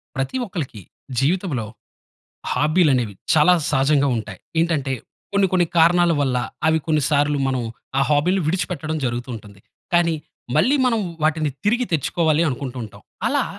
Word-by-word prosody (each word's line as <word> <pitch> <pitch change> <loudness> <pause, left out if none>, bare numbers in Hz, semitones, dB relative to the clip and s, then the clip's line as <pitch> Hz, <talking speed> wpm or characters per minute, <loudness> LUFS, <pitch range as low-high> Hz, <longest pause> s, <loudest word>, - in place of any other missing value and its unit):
ప్రతి 135 - -2
ఒక్కళ్ళకి 155 - -6 0.4
జీవితంలో 145 - 0 0.9
హాబీలనేవి 145 - +2 0.2
చాలా 155 +3 +6 0.2
సహజంగా 140 +1 +3
ఉంటాయి. 110 -4 -6 0.2
ఏంటంటే, 155 -5 0 0.4
కొన్ని 200 -1 +3
కొన్ని 180 -2 +3
కారణాల 170 +1 +5
వల్ల 130 -3 +1 0.3
అవి 160 0 +4
కొన్ని 155 -2 +2
సార్లు 145 0 +2
మనం 130 -2 -1 0.4
ఆ - - +3
హాబీ‌లని 175 +6 +2
విడిచిపెట్టడం 160 -2 -2
జరుగుతూ 120 0 -2
ఉంటుంది. 105 -2 -12 0.3
కానీ, 170 -1 +3 0.4
మళ్ళీ 280 +3 +4
మనం 230 -3 +2 0.2
వాటిని 155 -1 +1
తిరిగి 240 +4 +2
తెచ్చుకోవాలి 160 +1 +1
అనుకుంటూంటాం. 125 -5 -6 0.3
అలా - - +1
155 Hz, 130 wpm, -21 LUFS, 135-175 Hz, 0.9 s, చాలా